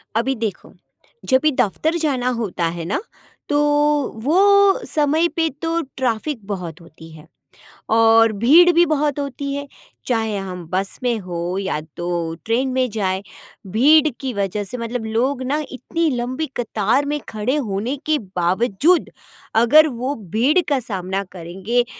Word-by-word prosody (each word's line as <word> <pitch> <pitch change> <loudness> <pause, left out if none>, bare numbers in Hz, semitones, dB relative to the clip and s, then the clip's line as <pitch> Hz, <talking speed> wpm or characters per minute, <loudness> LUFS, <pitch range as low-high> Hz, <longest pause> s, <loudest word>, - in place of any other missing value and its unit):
अभी 260 +4 +1
देखो, 220 -5 -5 0.5
जब 260 -1 +4
भी 305 - +4
दफ़्तर 305 - 0
जाना 270 -6 -1
होता 180 -6 -2
है 165 - -5
ना, 205 - -1 0.5
तो 290 - +2 0.7
वो 395 +5 +5
समय 310 +3 +2
पे 325 -1 +1
तो 330 0 0 0.2
ट्रैफ़िक 240 -1 -2
बहुत 180 -4 -5
होती 160 0 -14
है, 155 -1 -14 0.6
और 225 0 +5
भीड़ 310 - +6
भी 345 +1 +6
बहुत 295 -1 0
होती 280 0 -4
है, 285 0 -4 0.4
चाहे 220 -4 0
हम 180 -3 -6
बस 190 +1 -1
में 240 -2 +1
हो 175 +1 -3
या 190 -6 -2 0.2
तो 175 - -5 0.4
ट्रेन 245 +4 0
में 255 -1 +1
जाएँ। 195 -2 -1 0.5
भीड़ 300 +8 +5
की 265 -2 -3
वजह 200 +1 -2
से 250 +6 -6
मतलब 230 0 -4
लोग 250 +5 -1
ना 280 +4 -1
इतनी 330 +5 -1
लंबी 255 +6 -2
कतार 230 +3 0
में 295 +1 -1
खड़े 220 +6 -1
होने 230 +1 -2
के 310 -1 +2 0.2
बावजूद 205 - +2 0.4
अगर 270 +8 +6
वो 255 +2 -3 0.2
भीड़ 280 +11 +4
का 280 -3 +1
सामना 195 -3 -3
करेंगे, 190 +8 -2
240 Hz, 150 wpm, -20 LUFS, 200-290 Hz, 0.7 s, भीड़